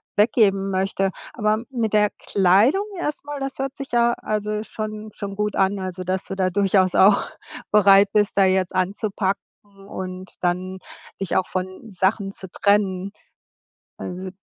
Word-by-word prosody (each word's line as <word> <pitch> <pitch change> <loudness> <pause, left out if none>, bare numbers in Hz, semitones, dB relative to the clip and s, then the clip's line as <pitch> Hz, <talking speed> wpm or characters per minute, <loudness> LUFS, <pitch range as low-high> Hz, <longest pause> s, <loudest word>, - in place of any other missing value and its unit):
weggeben 205 -3 +3
möchte. 195 0 0 0.2
Aber 215 0 0
mit 230 -5 -2
der 210 -1 +4
Kleidung 205 - +2
erst 295 -4 -3
mal, 290 -1 -6
das 270 0 -5
hört 270 0 -3
sich 275 0 -8
ja 235 0 +3
also 210 -1 -3
schon 215 -1 -6
schon 200 -1 -6
gut 210 +1 -1
an, 195 +1 +2
also, 185 -1 -5
dass 185 +1 -1
du 195 - -5
da 185 -1 +1
durchaus 190 -1 +2
auch 200 +1 +5 0.4
bereit 200 -1 +6
bist, 210 -1 +2
da 195 - +6
jetzt 185 -1 +1
anzupacken 195 +1 -1 0.5
und 185 -1 -7
dann 185 +1 -1 0.4
dich 195 - -2
auch 190 - +2
von 185 +4 -5
Sachen 195 +1 0
zu 190 -1 -9
trennen. 200 -1 +1 0.9
Also 185 +1 -6
200 Hz, 155 wpm, -22 LUFS, 190-215 Hz, 0.9 s, bereit